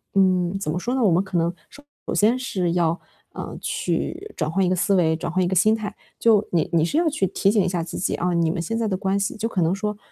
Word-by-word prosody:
嗯， 185 -1 +2
怎 195 - -3
么 165 - -2
说 240 +7 -2
呢， 265 - 0
我 210 - +5
们 180 +4 +3
可 190 -2 -3
能 170 +1 +1 0.2
首 290 0 -10
先 225 +5 +3
是 185 -9 -1
要， 170 -1 +1 0.3
嗯， - - -6
去 470 -3 -3
转 155 -2 -1
换 195 +3 +1
一 - - +1
个 185 - +2
思 195 +2 +2
维， 160 -3 +3
转 160 0 -4
换 185 - +1
一 - - +1
个 190 - -1
心 215 +5 +4
态。 215 -2 -5 0.2
就 215 -3 +4
你 170 -3 +1
你 165 - +4
是 230 - -1
要 335 0 +3
去 290 -10 0
提 195 +1 +1
醒 210 -2 +3
一 185 - 0
下 175 -2 -1
自 165 - -6
己， - - -1
啊， 180 +1 -1
你 170 -1 +2
们 170 - -3
现 225 +7 -2
在 230 -1 0
的 190 - -1
关 195 +1 0
系 200 - -2
就 220 - -1
可 185 - -1
能 165 +3 +2
说， 210 +1 -3
190 Hz, 300 characters per minute, -23 LUFS, 175-215 Hz, 0.3 s, 我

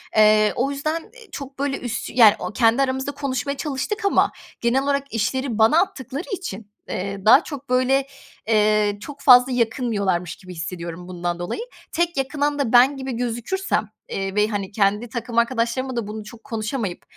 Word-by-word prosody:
Eee, 215 0 +5
o 270 +3 0
yüzden 310 +6 -3 0.2
i - - -31
çok, 275 -2 -8
böyle, 275 -1 -1
üst, 245 -2 -4
yani, 225 -4 +8 0.2
kendi 230 +3 +3
aramızda 265 +1 -1
konuşmaya 280 -1 -3
çalıştık 310 +11 -3
ama 400 - +3 0.3
genel 245 +3 +2
olarak 280 0 -1
işleri 235 +2 -1
bana 225 +10 +5
attıkları 275 - -4
için, 355 - -5 0.2
eee, 195 +1 -4
daha 255 +8 +7
çok, 285 -3 -8
böyle, 260 +2 +2 0.4
eee, 210 -1 +3
çok 285 +4 -9
fazla 250 0 +7
yakınmıyorlarmış 220 - 0
gibi 185 -1 -12
hissediyorum 170 +1 -6
bundan 175 -1 -3
dolayı. 175 - -4 0.3
Tek 340 -2 0
yakınan 290 +2 -1
da 255 -4 -1
ben 260 +3 +6
gibi 265 0 -4
gözükürsem, 240 - -2 0.2
eee, 195 0 -3
ve, 210 0 +3
hani, 205 -2 -3
kendi 210 +3 +1
takım 235 -1 -5
arkadaşlarımla 235 +2 0
da 230 -3 -2
bunu 215 0 -6
çok 225 +2 -13
konuşamayıp, 220 -5 -4
240 Hz, 165 wpm, -22 LUFS, 210-275 Hz, 0.4 s, yani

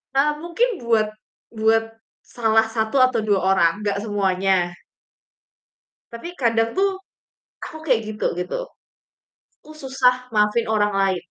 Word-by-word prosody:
Eee, 285 +2 +3
mungkin 345 +8 +1 0.2
buat 225 -2 +2 0.4
buat 225 0 +2 0.4
salah 220 -2 +1
satu 220 +1 -2
atau 255 -2 0
2 205 -3 +2
orang, 185 -3 +3
nggak 200 -1 -1
semuanya. 190 -3 0 1.3
Tapi 340 +10 -8
kadang 230 -2 +1
tuh, 390 0 +1 0.7
aku 315 - -7
kayak 250 -5 +3
gitu, 210 - -1
gitu. 180 - -4 1.0
Aku - - -16
susah 255 -1 +1
maafin 210 +2 +2
orang 210 -1 +1
lain. 190 -2 +1
225 Hz, 120 wpm, -22 LUFS, 200-250 Hz, 1.3 s, Eee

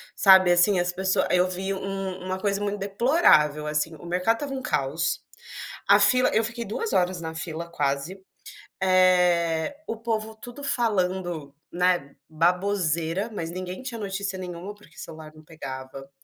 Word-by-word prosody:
Sabe, 190 -2 +7
assim, 175 +2 +4
as 175 0 +1
pessoa 190 +1 +1
eu 180 0 +4
vi 190 +2 -3
um 195 -1 -4
uma 185 0 -3
coisa 200 0 -1
muito 205 0 -2
deplorável, 195 - +3
assim, 150 +2 -1
o 165 - -13
mercado 180 +6 +1
estava 275 -1 -4
um 265 - -4
caos, 150 - -1 0.6
a - - +7
fila 255 0 +4
eu 225 - +3
fiquei 235 +1 -4
2 425 - -3
horas 180 0 +1
na 160 0 -5
fila 160 +1 -5
quase, 150 +5 -2 0.6
eh, 180 - +3
o 225 - -3
povo 220 -1 -3
tudo 245 +5 -10
falando, 180 - -1 0.2
né, 175 -5 0
baboseira, 175 +2 0
mas 165 -5 -4
ninguém 185 +4 -6
tinha 235 -4 -6
notícia 195 -1 -3
nenhuma, 180 +2 -7
porque 210 - -21
celular 155 -2 -9
não 155 0 -16
pegava 135 -3 -8
185 Hz, 155 wpm, -25 LUFS, 165-200 Hz, 0.6 s, Sabe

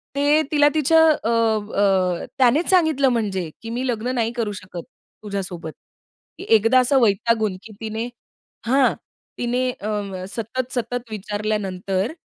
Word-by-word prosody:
ते 290 +2 +3
तिला 290 -1 +5
तिच्या 315 +1 +4 0.3
अ, 230 - +1 0.4
अ, 190 -3 +2
त्यानेच 265 +6 +3
सांगितलं, 315 -7 +3
म्हणजे 200 -8 -1
की 225 - -7
मी 245 +3 -2
लग्न 245 +1 -2
नाही 230 -2 0
करू 230 -4 -2
शकत, 185 -3 -8 0.4
तुझ्यासोबत. 190 -6 -5 0.7
की - - -7
एकदा 225 +4 +3
असं 265 +2 +3
वैतागून 215 -1 +1
की 220 - -12
तिने 220 +1 -3 0.6
हां. 265 +1 +3 0.4
तिने 250 +1 0
अं, 200 -3 -4
सतत, 240 +4 -4
सतत 245 -1 -3
विचारल्यानंतर, 205 0 -2
225 Hz, 130 wpm, -22 LUFS, 200-255 Hz, 0.7 s, तिला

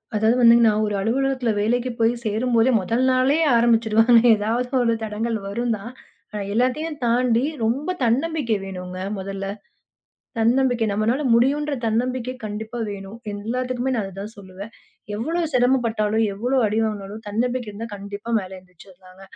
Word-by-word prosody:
அதாவது 220 +3 +3
வந்து 235 -1 +8
நான் 215 -1 +3
ஒரு 210 - -2
அலுவலகத்தில 255 +3 0
வேலைக்குச் 240 +2 -1
போய் 225 +1 +4
சேரும்போதே 230 +3 +2
முதல் 225 +7 -1
நாளே 260 +3 +3 0.2
ஆரம்பிச்சுடுவாங்க. 230 0 +4 0.2
ஏதாவது 225 +4 -1 0.2
ஒரு 230 -1 +2
தடங்கல் 220 +1 -2
வரும் 235 +4 -1
தான். 205 +4 -9 0.4
ஆனா 210 -1 -4
எல்லாத்தையும் 255 +7 0
தாண்டி 240 0 +2 0.2
ரொம்ப 275 +11 0
தன்னம்பிக்கை 260 0 +1
வேணுங்க 185 -1 -7 0.2
முதல்ல. 195 0 -5 0.9
தன்னம்பிக்கை. 240 0 +2
நம்மளால 225 +7 0
முடியும்ன்ற 285 +5 +2
தன்னம்பிக்கை 250 +2 -1
கண்டிப்பா 220 +3 -6
வேணும். 200 +2 -8
எல்லாத்துக்குமே 250 +5 -2
நான் 225 - 0
அதைத்தான் 195 +2 -7
சொல்லுவேன். 195 +3 -10 0.4
எவ்ளோ 320 +11 -2
சிரமம் 250 0 +3
பட்டாலும், 220 0 +1
எவ்ளோ 245 +7 -1
அடி 215 +1 0
வாங்குனாலும் 210 0 -5
தன்னம்பிக்கை 240 +2 -1
இருந்தா 220 +3 -7
கண்டிப்பா 200 +3 -7
மேல 190 -3 -7
எழுந்திருச்சுடலாங்க. 185 +1 -18
230 Hz, 135 wpm, -22 LUFS, 210-250 Hz, 0.9 s, வந்து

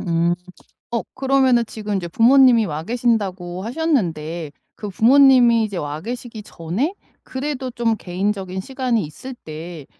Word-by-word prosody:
음. 170 -1 +1 0.6
어 235 -1 -1
그러면은 265 -3 +3
지금 210 -2 -4
이제 175 -2 -3
부모님이 235 - +5
와 155 -2 -4
계신다고 195 -6 -1
하셨는데 175 - -2 0.2
그 210 -2 -7
부모님이 245 0 +5
이제 200 -4 -4
와 150 +1 -5
계시기 235 0 -6
전에 200 - -3 0.3
그래도 260 -1 -4
좀 230 -2 0
개인적인 190 0 -3
시간이 255 0 -1
있을 255 - -9
때 160 - -9
220 Hz, 300 characters per minute, -20 LUFS, 175-250 Hz, 0.6 s, 부모님이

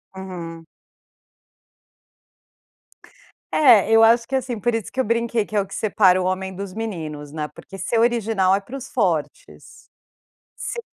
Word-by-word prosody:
Uhum. 170 -3 -8 2.9
É, 240 -10 +6
eu 225 0 +6
acho 230 +1 +4
que, - - -11
assim 250 -4 -2
Por 240 +2 0
isso 225 -3 -3
que 260 - -6
eu - - +4
brinquei 230 0 0
que 215 - -8
é 205 - +3
o - - -4
que - - -9
separa 190 -3 +3
o 185 - -1
homem 190 0 -2
dos 195 -1 -6
meninos, 160 -10 -6
né. 150 -1 -4
Porque 195 - -12
ser 225 +4 -1
original 225 -5 +2
é - - 0
para 235 +7 -10
os 265 -1 -7
fortes. 165 - -2 1.0
Ser 470 - -4
205 Hz, 160 wpm, -22 LUFS, 185-230 Hz, 2.9 s, É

